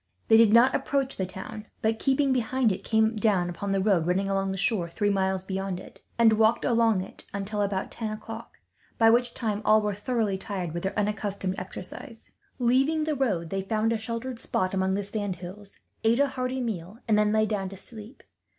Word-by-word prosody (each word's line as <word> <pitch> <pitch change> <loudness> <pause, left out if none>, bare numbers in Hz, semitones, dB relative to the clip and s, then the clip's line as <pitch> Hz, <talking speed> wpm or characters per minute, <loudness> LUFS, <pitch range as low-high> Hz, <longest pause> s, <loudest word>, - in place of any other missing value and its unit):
They 220 - +8
did 225 -2 +6
not 235 +3 +6
approach 275 0 0
the 190 - -2
town 195 +3 -8 0.2
but, 220 0 +1
keeping 270 0 +2
behind 250 -1 +1
it, 190 - -4
came 220 0 +2
down 195 -5 +1
upon 200 +4 -5
the 195 0 +1
road 190 -5 +2
running 190 +2 +1
along 195 0 0
the 190 - -3
shore, 195 -3 +1
three 205 +4 0
miles 190 -1 0
beyond 190 -1 -3
it; - - -13 0.2
and 230 -2 +6
walked 220 +1 +3
along 230 -5 +3
it 185 - -8
until 200 +1 -2
about 200 -2 -1
ten 225 -2 -4
o'clock, 225 +2 -8 0.4
by 225 -1 +6
which 240 +1 +2
time 215 -4 -2
all 215 0 +5
were 210 -1 -1
thoroughly 210 -2 -1
tired 190 -4 -4
with 170 - -3
their 195 +2 -3
unaccustomed 200 -2 -1
exercise. - - -9 0.3
Leaving 270 +6 +2
the 310 -1 0
road, 195 - -1
they 195 - -1
found 215 +3 0
a 225 - -1
sheltered 230 +2 -5
spot 185 -4 -1
among 190 0 +1
the 200 - -1
sand 200 -1 -3
hills, 190 +3 -8 0.3
ate 230 +3 +3
a 285 0 +3
hearty 255 0 -2
meal, 205 -4 -4
and 220 - +4
then 210 0 +3
lay 215 0 +3
down 200 -3 -2
to 195 - -10
sleep. 220 +4 -10
210 Hz, 205 wpm, -27 LUFS, 195-230 Hz, 0.4 s, They